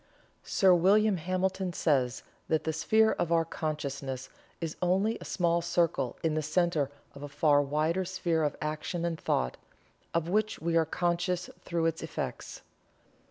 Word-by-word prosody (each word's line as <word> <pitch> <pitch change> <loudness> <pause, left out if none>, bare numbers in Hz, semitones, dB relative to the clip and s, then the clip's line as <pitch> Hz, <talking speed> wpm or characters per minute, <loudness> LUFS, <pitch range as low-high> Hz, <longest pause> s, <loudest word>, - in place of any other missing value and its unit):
Sir 190 -3 +4
William 200 +3 +4
Hamilton 185 +2 -1
says 130 -6 +1 0.2
that 155 -1 +1
the 160 - -1
sphere 220 +8 +3
of 170 - -1
our 165 -1 +3
consciousness 140 -5 -4 0.3
is 165 -2 -4
only 190 +5 +2
a - - -8
small 170 -2 +1
circle 170 -1 0
in 160 -1 +1
the 155 - 0
center 155 -2 +1 0.2
of 140 - -11
a 145 - -5
far 145 0 +3
wider 155 +6 0
sphere 175 -3 -1
of 150 -1 0
action 155 +3 -3
and 165 -2 -2
thought, 60 - 0 0.5
of 170 -1 0
which 215 +4 +1
we 165 +1 -1
are 165 -1 +4
conscious 175 +2 -1
through 170 -1 -1
its 165 0 0
effects. - - -5
165 Hz, 160 wpm, -30 LUFS, 155-180 Hz, 0.5 s, Sir